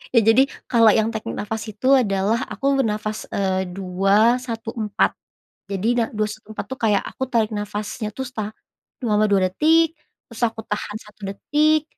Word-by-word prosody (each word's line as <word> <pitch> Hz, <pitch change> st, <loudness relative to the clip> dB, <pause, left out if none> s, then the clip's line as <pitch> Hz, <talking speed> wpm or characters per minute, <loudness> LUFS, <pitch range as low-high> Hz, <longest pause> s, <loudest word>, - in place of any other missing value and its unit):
ya 230 Hz, -, +7 dB
jadi, 225 Hz, +5 st, +6 dB, 0.3 s
kalau 230 Hz, -3 st, +6 dB
yang 220 Hz, 0 st, +2 dB
teknik 220 Hz, -, -4 dB
nafas 220 Hz, +1 st, -4 dB
itu 235 Hz, +6 st, +1 dB
adalah 210 Hz, -2 st, +2 dB
aku 275 Hz, 0 st, 0 dB
bernafas, 215 Hz, -1 st, -2 dB
eee, 190 Hz, -1 st, 0 dB
2-1-4. 215 Hz, +4 st, +1 dB, 0.6 s
Jadi, 195 Hz, +3 st, -1 dB
da 230 Hz, -, +3 dB
2-1-4 215 Hz, 0 st, -4 dB
tuh 265 Hz, -, -5 dB
kayak 210 Hz, -3 st, +2 dB
aku -, -, -5 dB
tarik 225 Hz, -3 st, +1 dB
nafasnya 210 Hz, +1 st, -4 dB
tuh, 265 Hz, -, -3 dB
sa 215 Hz, -4 st, -5 dB, 0.5 s
selama 215 Hz, -2 st, +3 dB
2 195 Hz, -2 st, +3 dB
detik, 320 Hz, -, +4 dB, 0.4 s
terus 230 Hz, 0 st, -10 dB
aku 225 Hz, 0 st, -7 dB
tahan 210 Hz, 0 st, -3 dB
1 210 Hz, 0 st, -19 dB
detik, 305 Hz, +8 st, +2 dB
215 Hz, 150 wpm, -22 LUFS, 205-235 Hz, 0.6 s, ya